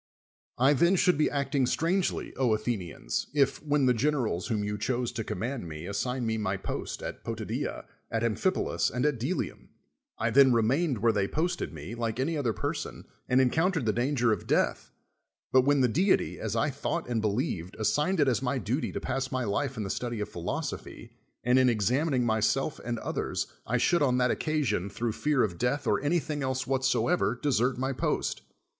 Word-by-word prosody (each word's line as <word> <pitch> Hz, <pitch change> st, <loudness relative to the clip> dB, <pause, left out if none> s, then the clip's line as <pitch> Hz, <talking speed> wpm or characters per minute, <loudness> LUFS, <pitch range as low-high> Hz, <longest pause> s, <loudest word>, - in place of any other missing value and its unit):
I 135 Hz, +4 st, +5 dB
then 170 Hz, +6 st, +4 dB
should 180 Hz, 0 st, +4 dB
be 150 Hz, -, +2 dB
acting 140 Hz, -2 st, 0 dB
strangely, 175 Hz, +8 st, 0 dB
Athe 110 Hz, -5 st, +1 dB
nians, 85 Hz, -, -4 dB
if. 140 Hz, -2 st, +2 dB
when 145 Hz, -2 st, +2 dB
the 125 Hz, -, +5 dB
generals 120 Hz, -, 0 dB
whom 105 Hz, -2 st, -1 dB
you 105 Hz, 0 st, -2 dB
chose 125 Hz, +1 st, -1 dB
to 110 Hz, -, -3 dB
commar.d 125 Hz, +3 st, -3 dB
me 80 Hz, -2 st, -7 dB
assigiied 125 Hz, +6 st, -2 dB
me 110 Hz, -1 st, -1 dB
my 100 Hz, -2 st, -1 dB
post -, -, -5 dB
at -, -, -6 dB
Potida^a, -, -, -4 dB, 0.2 s
at 115 Hz, 0 st, -1 dB
Amphipolis, 120 Hz, -, +1 dB
and 125 Hz, +2 st, -1 dB
at 145 Hz, -5 st, +1 dB
Dclium, 145 Hz, +11 st, -3 dB, 0.5 s
I 115 Hz, +1 st, 0 dB
then 135 Hz, 0 st, +6 dB
remained 120 Hz, -, +1 dB
where 115 Hz, -, +5 dB
they 100 Hz, -2 st, 0 dB
posted 170 Hz, -, -1 dB
me, 80 Hz, +6 st, -8 dB
like 115 Hz, 0 st, -3 dB
any 155 Hz, +5 st, 0 dB
other 135 Hz, -6 st, 0 dB
person, 105 Hz, -, -4 dB, 0.2 s
and 125 Hz, -, +4 dB
encountered 160 Hz, +4 st, +2 dB
the 110 Hz, -, +2 dB
danger 120 Hz, -2 st, +2 dB
of 100 Hz, -, -5 dB
death, -, -, +1 dB, 0.6 s
but 130 Hz, 0 st, +5 dB
when 145 Hz, -1 st, +4 dB
the 125 Hz, -, +5 dB
deity, 180 Hz, -, +1 dB
as -, -, -3 dB
I -, -, +1 dB
thought -, -, -3 dB
and 120 Hz, -2 st, 0 dB
believed, 100 Hz, -4 st, -2 dB
assigned 150 Hz, -, +1 dB
it 145 Hz, -, +4 dB
as 125 Hz, -2 st, +2 dB
my 135 Hz, +1 st, 0 dB
duty 125 Hz, +5 st, -1 dB
to -, -, -2 dB
pass 135 Hz, +1 st, -2 dB
my 130 Hz, -1 st, -1 dB
life 130 Hz, +5 st, -1 dB
in 110 Hz, -, -2 dB
the 95 Hz, -, -3 dB
study 120 Hz, -2 st, -3 dB
of 105 Hz, -, -3 dB
phil 85 Hz, -1 st, -8 dB
osophy, -, -, -4 dB, 0.3 s
and 125 Hz, +2 st, +4 dB
in 130 Hz, -1 st, +5 dB
examining 125 Hz, -, +1 dB
im'self 115 Hz, +6 st, +1 dB
and 120 Hz, -1 st, -2 dB
other.s, -, -, -2 dB, 0.2 s
I 125 Hz, -, +1 dB
should 170 Hz, +7 st, +2 dB
on 125 Hz, -3 st, +3 dB
that 125 Hz, -1 st, +3 dB
occasion, 150 Hz, -, 0 dB
through 115 Hz, +3 st, -2 dB
fear 145 Hz, +4 st, +1 dB
of 90 Hz, -5 st, -2 dB
death 135 Hz, +4 st, 0 dB
or -, -, +2 dB
ajiylhing 150 Hz, 0 st, 0 dB
else 130 Hz, 0 st, -1 dB
whatsoever, 135 Hz, +1 st, +1 dB
desert 130 Hz, -3 st, +1 dB
my 130 Hz, +1 st, -1 dB
post. -, -, -1 dB
125 Hz, 190 wpm, -29 LUFS, 110-145 Hz, 0.6 s, then